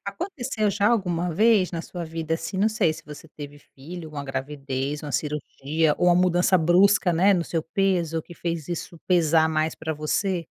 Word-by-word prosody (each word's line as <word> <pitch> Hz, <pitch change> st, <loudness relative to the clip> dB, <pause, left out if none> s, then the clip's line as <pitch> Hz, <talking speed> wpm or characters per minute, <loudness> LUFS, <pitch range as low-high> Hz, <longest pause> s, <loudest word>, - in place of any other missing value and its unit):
Aconteceu 235 Hz, -, -3 dB
já 205 Hz, +1 st, +2 dB
alguma 180 Hz, -6 st, 0 dB
vez 210 Hz, 0 st, +3 dB
na 165 Hz, -2 st, -4 dB
sua 175 Hz, 0 st, -7 dB
vida, 160 Hz, 0 st, -3 dB
assim, 190 Hz, +3 st, -5 dB
não 215 Hz, +3 st, +3 dB
sei 210 Hz, -7 st, +1 dB
se -, -, -11 dB
você 150 Hz, +1 st, -11 dB
teve 145 Hz, -1 st, -10 dB
filho, 160 Hz, +4 st, -10 dB
ou 150 Hz, -, -14 dB
uma 145 Hz, -, -4 dB
gravidez, 135 Hz, +1 st, -4 dB
ou -, -, -6 dB
uma -, -, -6 dB
cirurgia, 150 Hz, +1 st, -1 dB
ou 180 Hz, -, +1 dB
uma 175 Hz, -, +5 dB
mudança 180 Hz, +1 st, +3 dB
brusca, 180 Hz, +3 st, +4 dB
né, 190 Hz, +5 st, +4 dB
no 175 Hz, -3 st, +1 dB
seu 165 Hz, -2 st, -2 dB
peso, 170 Hz, -3 st, 0 dB
que 175 Hz, -, -13 dB
fez 165 Hz, -3 st, -4 dB
isso 170 Hz, 0 st, -5 dB
pesar 160 Hz, -3 st, +4 dB
mais 155 Hz, 0 st, 0 dB
pra 160 Hz, 0 st, -4 dB
você? 170 Hz, +4 st, -1 dB
165 Hz, 200 wpm, -24 LUFS, 155-185 Hz, -, uma